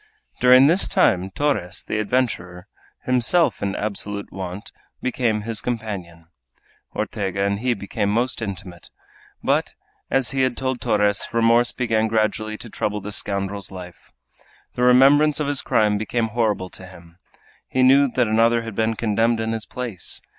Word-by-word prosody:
During 125 +1 +7
this 170 +7 +3
time 95 - +2
Torres, 95 -7 -1
the 110 - -3
adventurer, 100 -6 -2 0.4
himself 130 +7 +2
in 100 -1 -2
absolute 100 -1 -4
want, 95 +2 -7 0.3
became 120 -4 -1
his 115 -1 -2
companion. 100 -8 -5 0.7
Ortega 100 -2 -2
and 100 0 0
he 125 +1 0
became 100 0 -3
most 120 +3 -1
intimate. 95 -5 -7 0.5
But, - - 0 0.3
as 135 -2 +2
he 135 -1 0
had 130 -2 0
told 130 -1 -2
Torres, 105 -1 +1
remorse 115 +1 +3
began 110 -3 0
gradually 110 0 -1
to 120 - -10
trouble 105 -1 -3
the 105 +1 -7
scoundrel's 100 0 -3
life. 90 -2 -11 0.6
The - - -4
remembrance 140 +4 +5
of 150 - 0
his 140 -1 +1
crime 105 -1 +1
became 115 +1 -1
horrible 105 -5 -1
to 95 - -9
him. 85 -1 -16 0.5
He 130 - +1
knew 135 +2 +6
that 125 -2 0
another 115 +2 +3
had 115 -1 -7
been 110 +2 0
condemned 115 +1 +1
in 110 0 -2
his 110 -1 -3
place! 120 -8 -4
110 Hz, 155 wpm, -22 LUFS, 100-125 Hz, 0.7 s, During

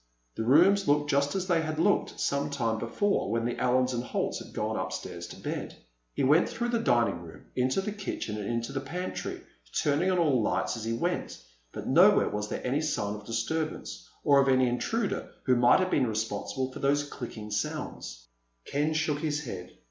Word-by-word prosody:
The - - -4
rooms 180 - +5
looked 145 0 +3
just 140 +3 +2
as 190 -1 -1
they 175 -3 +2
had 155 -1 -3
looked 200 +6 +1
some 140 +1 0
time 115 -6 -1
before, 200 - 0
when 115 +1 0
the 120 - -2
Allens 125 0 +2
and 120 0 -2
Holts - - -2
had - - -14
gone - - -2
upstairs - - -4
to - - -11
bed. - - -5 0.4
He - - 0
went 150 +6 +4
through 240 +1 -2
the 235 -1 +1
dining 120 - +2
room, 85 -2 -12
into 130 +8 +1
the 210 - -3
kitchen, 195 - -4
and 100 - -4
into 115 +2 -2
the 135 - -1
pantry, 175 +7 -5 0.4
turning 150 +5 +2
on 185 - +2
all 145 -8 +3
the 105 - +1
lights - - 0
as 115 -2 -6
he 115 - -1
went. 115 - -2 0.3
But - - -7
nowhere - - +5
was 105 0 -3
there - - -4
any 135 +4 +1
sign 105 -10 -1
of 105 0 -9
disturbance, 115 - -3
or 140 -1 +5
of 135 - +1
an 130 -1 +4
intruder 160 - -1
who 130 - +3
might 120 +4 +5
have 185 0 0
been 130 -3 +3
responsible 110 +4 -2
for - - -8
those 145 +1 +2
clicking 110 -6 -7
sounds. - - -4 0.4
Ken 150 +2 0
shook 155 -2 0
his 150 -1 -1
head. 95 -8 -6
135 Hz, 200 wpm, -29 LUFS, 115-155 Hz, 0.4 s, rooms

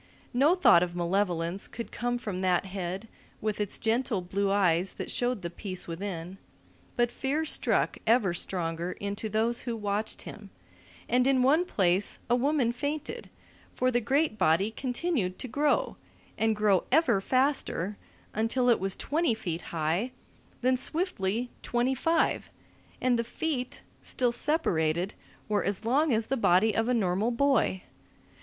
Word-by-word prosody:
No 285 +8 +4
thought 265 - +6
of 175 -1 -2
malevolence 175 0 -1
could 235 - -7
come 245 0 -1
from 205 -6 -4
that 185 0 +2
head 190 +2 -5 0.3
with 215 -1 -2
its 205 - -1
gentle 225 -1 0
blue 195 +3 -1
eyes 185 -2 +2
that - - -5
showed 245 -5 -1
the 170 - -2
peace 185 0 -5
within, 175 +1 -5 0.6
but 240 0 +2
fear 290 +4 -1
struck - - +1
ever 220 -6 +4
stronger 170 0 -2
into 205 +2 -4
those 225 +3 +1
who 235 -2 -3
watched 210 +1 -2
him, 205 -2 -10 0.6
and 250 +2 +3
in 265 -2 +3
one 305 +7 +4
place 190 - +2
a - - +6
woman 265 -1 +2
fainted; 290 +5 -4 0.5
for 255 0 +1
the 240 0 +1
great 270 0 +1
body 170 +7 +3
continued 245 - -2
to - - -4
grow, 285 +4 +1 0.4
and 220 0 +1
grow 205 -3 +2
ever 255 -9 +4
faster, 255 - +1 0.4
until 235 +3 +1
it 235 - +4
was 195 0 -1
twenty 300 -4 0
feet 175 -6 -4
high, 165 +8 0 0.5
then 255 0 +3
swiftly 245 - -1
twenty 245 +2 0
five, 325 +6 +1 0.5
and 250 -2 +2
the - - +1
feet, 255 +1 -3 0.2
still 245 -2 0
separated, 185 - 0 0.3
were 205 -3 +1
as 200 +2 -2
long 285 +6 +3
as 225 -1 +2
the 270 - -1
body 215 -2 +3
of 225 +2 +1
a - - +3
normal 200 +1 +1
boy. 245 -6 +1
220 Hz, 150 wpm, -28 LUFS, 190-255 Hz, 0.6 s, thought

